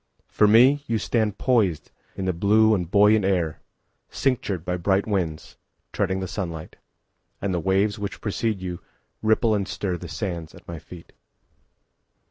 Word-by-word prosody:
For 105 Hz, -, +3 dB
me, 130 Hz, +7 st, +5 dB
You 115 Hz, -, 0 dB
stand 110 Hz, -1 st, 0 dB
poisedIn 100 Hz, -, +1 dB, 0.3 s
the 95 Hz, -, 0 dB
blue 110 Hz, +5 st, +4 dB
and 90 Hz, -5 st, -1 dB
buoyant 105 Hz, +2 st, +5 dB
air, 90 Hz, -5 st, 0 dB, 0.5 s
Cinctured 100 Hz, -10 st, -1 dB
by 90 Hz, -, -1 dB
bright 95 Hz, +3 st, +1 dB
winds, 90 Hz, -7 st, -3 dB, 0.4 s
Treading 95 Hz, -1 st, -1 dB
the 95 Hz, -, -3 dB
sunlight. 85 Hz, -5 st, -6 dB, 0.6 s
And 100 Hz, -1 st, -2 dB
the 90 Hz, -, 0 dB
waves 100 Hz, +4 st, +1 dB
which 100 Hz, -1 st, -5 dB
precede 105 Hz, -1 st, -2 dB
youRipple 110 Hz, +5 st, -1 dB
and 100 Hz, -1 st, -2 dB
stirThe 90 Hz, -3 st, -4 dB
sands 85 Hz, -5 st, -5 dB
at -, -, -16 dB
my 85 Hz, -2 st, -6 dB
feet. 85 Hz, +1 st, -13 dB
100 Hz, 140 wpm, -24 LUFS, 90-110 Hz, 0.6 s, me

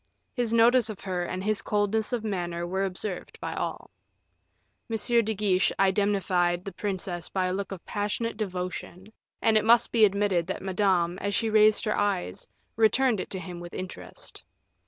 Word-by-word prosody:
His 240 Hz, -3 st, -1 dB
notice 230 Hz, 0 st, +5 dB
of 210 Hz, -, -7 dB
her 180 Hz, -2 st, -2 dB
and 185 Hz, +1 st, -4 dB
his 215 Hz, 0 st, 0 dB
coldness 210 Hz, +2 st, 0 dB
of 240 Hz, -3 st, -1 dB
manner 175 Hz, -5 st, -2 dB
were 190 Hz, +2 st, -1 dB
observed 190 Hz, 0 st, -5 dB
by -, -, -4 dB
all. -, -, -4 dB, 1.0 s
M. 225 Hz, -, -1 dB, 0.3 s
de 220 Hz, 0 st, -2 dB
Guiche 195 Hz, -2 st, +2 dB
indemnified 190 Hz, -3 st, +1 dB
the 195 Hz, -, -5 dB
princess 185 Hz, -3 st, -4 dB
by 185 Hz, -1 st, 0 dB
a 180 Hz, -, -1 dB
look 200 Hz, +1 st, -4 dB
of 190 Hz, -3 st, -8 dB
passionate 210 Hz, +3 st, -2 dB
devotion, 185 Hz, 0 st, -5 dB, 0.3 s
and 220 Hz, -1 st, +5 dB
it -, -, -3 dB
must 235 Hz, +2 st, +4 dB
be 230 Hz, -2 st, +4 dB
admitted 200 Hz, -4 st, +2 dB
that 190 Hz, -, -4 dB
Madame, 185 Hz, -2 st, +1 dB
as 200 Hz, 0 st, -1 dB
she 225 Hz, -1 st, 0 dB
raised 215 Hz, 0 st, +5 dB
her 215 Hz, -, +1 dB
eyes, 200 Hz, -, -1 dB, 0.3 s
returned 225 Hz, +1 st, +3 dB
it -, -, -5 dB
to 190 Hz, -, -5 dB
him 180 Hz, -2 st, -7 dB
with 175 Hz, 0 st, -9 dB
interest. 185 Hz, 0 st, -8 dB
200 Hz, 175 wpm, -27 LUFS, 185-215 Hz, 1.0 s, notice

